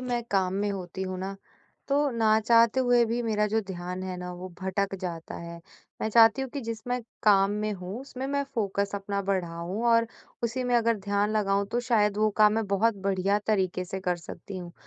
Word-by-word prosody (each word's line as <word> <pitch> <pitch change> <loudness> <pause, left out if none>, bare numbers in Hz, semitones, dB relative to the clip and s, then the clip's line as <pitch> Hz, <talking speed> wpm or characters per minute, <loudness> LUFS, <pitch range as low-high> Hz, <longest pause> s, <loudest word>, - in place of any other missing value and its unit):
मैं 245 -1 -2
काम 190 -2 +1
में 205 - 0
होती 190 -1 -5
हूँ 185 -1 -4
ना, 195 +1 -4 0.5
तो 285 +1 +2
ना 220 -2 +3
चाहते 230 +2 +4
हुए 245 -2 +4
भी 235 +2 -1
मेरा 210 -2 +1
जो 220 +2 +1
ध्यान 180 0 -5
है 185 -1 -4
ना, 180 0 -6
वो 180 +1 -7
भटक 190 +1 -1
जाता 170 -3 -5
है। 170 0 -8 0.4
मैं - - 0
चाहती 225 +3 +6
हूँ 265 - -4
कि 285 - -4
जिस 230 -2 -5
मैं 250 0 -1 0.2
काम 200 -2 +5
में 215 0 -1
हूँ 190 +4 -6
उसमें 265 -1 -6
मैं 280 +1 0
फ़ोकस 200 -3 -1
अपना 200 0 -2
बढ़ाऊँ 180 +1 -2
और 230 0 +4 0.4
उसी 240 +2 -1
में 245 0 +1
अगर 230 -1 +2
ध्यान 205 +1 0
लगाऊँ 200 -1 +1
तो 240 - +1
शायद 215 -4 +2
वो 215 0 +4
काम 210 -1 +6
मैं 225 -1 0
बहुत 205 +3 +2
बढ़िया 195 +1 +2
तरीके 185 -4 +1
से 190 +1 -5
कर 180 -1 0
सकती 180 +3 -9
हूँ। 175 -1 -8
205 Hz, 210 wpm, -27 LUFS, 190-230 Hz, 0.5 s, चाहती